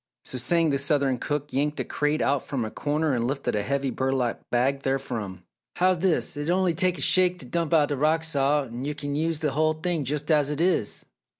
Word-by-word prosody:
So 130 - -5
saying, 165 +4 +2
the 140 - +1
southern 140 -3 +1
cook 145 +2 -3
yanked 150 +3 0
a - - +1
crate 150 +1 0
out 140 -2 +1
from 130 -5 -3
a 110 - -6
corner 150 0 -1
and 120 -1 0
lifted 135 -2 -2
a 105 - +1
heavy 140 +3 -1
burlap 130 -2 -1
bag 135 +3 +1
therefrom. 120 -9 -3 0.3
"How's 185 0 +2
dis? 175 -2 0
It'll 165 +6 0
onny 180 -2 +2
take 180 +2 +1
a - - -6
shake 180 +1 +4
t' 135 - -9
dump 165 +4 -2
out 150 -3 +4
th' 145 -3 -2
rock 155 +2 +2
salt 145 -3 +1
er 135 +5 -3
kin 145 -1 -4
yo' 155 +2 0
use 165 -2 -3
the 150 -3 0
hull 155 +3 +2
thing 160 0 -2
jus' 145 +2 -2
as 145 -2 +3
it 150 0 -3
is?" 170 - 0
145 Hz, 225 wpm, -25 LUFS, 135-160 Hz, 0.3 s, shake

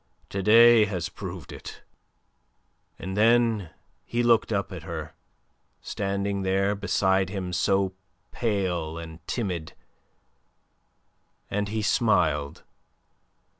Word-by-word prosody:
To 100 - -3
day 115 +2 +7
has 90 -4 -3
proved 90 -3 -8
it." - - -10 1.1
And 95 0 -6
then 115 -3 +3 0.3
he 120 +1 -1
looked 115 -2 +3
up 100 -2 -1
at 90 -3 -7
her, 80 -2 -6 0.7
standing 100 0 -2
there 95 +1 +1
beside 95 -2 +1
him 95 -2 -4
so 95 +1 +1 0.4
pale 90 -8 -1
and 80 0 -8
timid, 90 -9 -3 1.8
and 105 +1 -1
he 110 0 -2
smiled. 90 - +1
100 Hz, 100 wpm, -26 LUFS, 90-105 Hz, 1.8 s, day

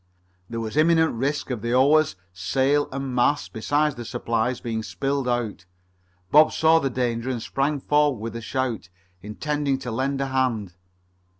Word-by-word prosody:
There 115 - -4
was 110 +1 -4
imminent 160 +1 +4
risk 135 +4 -2
of 120 -4 -3
the 120 +2 0
oars, 145 +3 +4 0.2
sail, 135 +10 +1
and 135 -1 -4
mast, 125 +4 +1
besides 145 +6 +1
the 120 - -7
supplies, 115 +2 -1
being 115 -2 -3
spilled 135 +4 -2
out. 120 -6 -2 0.7
Bob 155 +1 +7
saw 160 +1 +4
the 135 - -1
danger 120 -1 -2
and 125 -2 -2
sprang 140 +5 -1
forward 145 -1 +2
with 115 +1 -6
a 115 - -5
shout, 120 -4 -3 0.3
intending 140 +6 -2
to 125 -2 -6
lend 135 +4 -1
a 135 - 0
hand. 120 -8 -1
130 Hz, 165 wpm, -24 LUFS, 115-145 Hz, 0.7 s, Bob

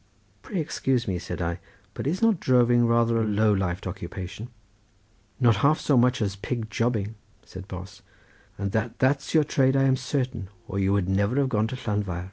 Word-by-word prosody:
"Pray 195 - -4
excuse 135 -5 -1
me," 90 -3 -1
said 90 0 -5
I, 85 +1 -2 0.3
"but - - -4
is 180 +8 -1
not 225 -6 +4
droving 120 -2 +4
rather 115 0 +2
a - - +2
low 105 0 +2
lifed 90 -2 -2
occupation?" 95 +3 -6 0.9
"Not 120 -5 +4
half 140 +9 +3
so 145 - +2
much 125 -1 +3
as 100 -1 -2
pig 110 +2 -4
jobbing," 110 -3 -1 0.3
said 95 +1 -10
Bos, 95 +1 -9 0.6
"and 100 0 -3
that 110 +2 -2
that's 140 +4 +1
your 155 - +6
trade 135 -2 +2
I 135 - +3
am 135 -1 +4
certain, 130 -6 -3 0.2
or 100 - -3
you 95 0 +2
would 100 -3 +1
never 100 +5 +1
have 140 -1 +2
gone 110 -3 +1
to 130 - -5
Llanfair." 105 -7 -2
115 Hz, 190 wpm, -26 LUFS, 100-130 Hz, 0.9 s, your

